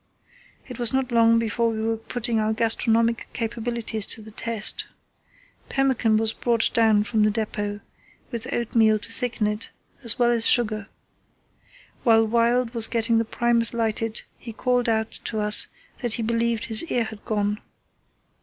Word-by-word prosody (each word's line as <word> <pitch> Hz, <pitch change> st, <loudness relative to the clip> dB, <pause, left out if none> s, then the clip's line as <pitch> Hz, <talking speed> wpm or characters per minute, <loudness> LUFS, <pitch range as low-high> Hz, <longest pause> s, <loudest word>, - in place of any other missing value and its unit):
It 250 Hz, -2 st, -10 dB
was 240 Hz, -2 st, +1 dB
not 265 Hz, -1 st, -1 dB
long 230 Hz, -1 st, +4 dB
before 230 Hz, +1 st, 0 dB
we 220 Hz, -1 st, -4 dB
were 225 Hz, 0 st, 0 dB
putting 225 Hz, 0 st, 0 dB
our 215 Hz, 0 st, 0 dB
gastronomic 230 Hz, +1 st, +1 dB
capabilities 230 Hz, -1 st, -1 dB
to 220 Hz, -, -1 dB
the 220 Hz, -, -12 dB
test. 225 Hz, -1 st, -1 dB, 0.8 s
Pemmican 260 Hz, -5 st, +1 dB
was 220 Hz, 0 st, 0 dB
brought 235 Hz, -2 st, +1 dB
down 220 Hz, -2 st, +3 dB
from 215 Hz, +1 st, -1 dB
the 210 Hz, -, +3 dB
depot, 205 Hz, -1 st, -4 dB, 0.5 s
with 235 Hz, +1 st, -5 dB
oatmeal 220 Hz, -2 st, +2 dB
to 220 Hz, +2 st, -5 dB
thicken 230 Hz, -1 st, 0 dB
it, 210 Hz, +1 st, -3 dB, 0.3 s
as 235 Hz, -1 st, +1 dB
well 240 Hz, -1 st, +2 dB
as 235 Hz, -1 st, +3 dB
sugar. 215 Hz, -3 st, +3 dB, 1.2 s
While 225 Hz, -2 st, +4 dB
Wild 235 Hz, +2 st, +1 dB
was 230 Hz, -2 st, 0 dB
getting 230 Hz, 0 st, 0 dB
the 230 Hz, -, -1 dB
Primus 235 Hz, 0 st, +2 dB
lighted 225 Hz, -1 st, -2 dB, 0.2 s
he 230 Hz, -, -9 dB
called 245 Hz, +1 st, 0 dB
out 220 Hz, 0 st, -1 dB
to 220 Hz, -, -3 dB
us 210 Hz, 0 st, +6 dB, 0.3 s
that 240 Hz, -3 st, -2 dB
he 230 Hz, -, -2 dB
believed 230 Hz, 0 st, -1 dB
his 220 Hz, +3 st, +2 dB
ear 245 Hz, -7 st, -1 dB
had 220 Hz, -1 st, -9 dB
gone. 210 Hz, -1 st, -2 dB
230 Hz, 160 wpm, -23 LUFS, 220-235 Hz, 1.2 s, us